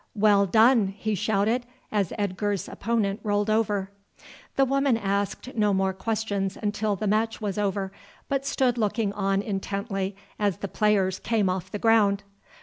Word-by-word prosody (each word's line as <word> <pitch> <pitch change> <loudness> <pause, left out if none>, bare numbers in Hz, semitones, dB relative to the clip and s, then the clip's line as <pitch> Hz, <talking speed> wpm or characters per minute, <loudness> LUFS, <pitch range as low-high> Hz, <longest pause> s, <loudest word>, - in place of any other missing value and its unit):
"Well 200 -1 +4
done!" 220 -1 +4
he 215 +1 -1
shouted, 215 +4 +1 0.3
as 200 -5 0
Edgar's 205 0 -1
opponent 215 -2 -1
rolled 205 0 0
over. 205 -3 0 0.6
The 270 - +4
woman 275 -2 +2
asked 200 +4 -2
no 210 -3 +2
more 190 0 +1
questions 200 -1 -2
until 210 0 -1
the 205 - -4
match 220 +2 +1
was 205 -2 -3
over, 195 -1 -1 0.4
but 275 -1 -1
stood 250 -3 +1
looking 210 -1 0
on 195 0 0
intently 195 -1 -3 0.2
as 205 -4 +1
the 200 - -4
players 195 -2 +1
came 215 -4 +1
off 185 0 -4
the 210 - -4
ground. 205 -3 +3
205 Hz, 150 wpm, -26 LUFS, 195-220 Hz, 0.6 s, Well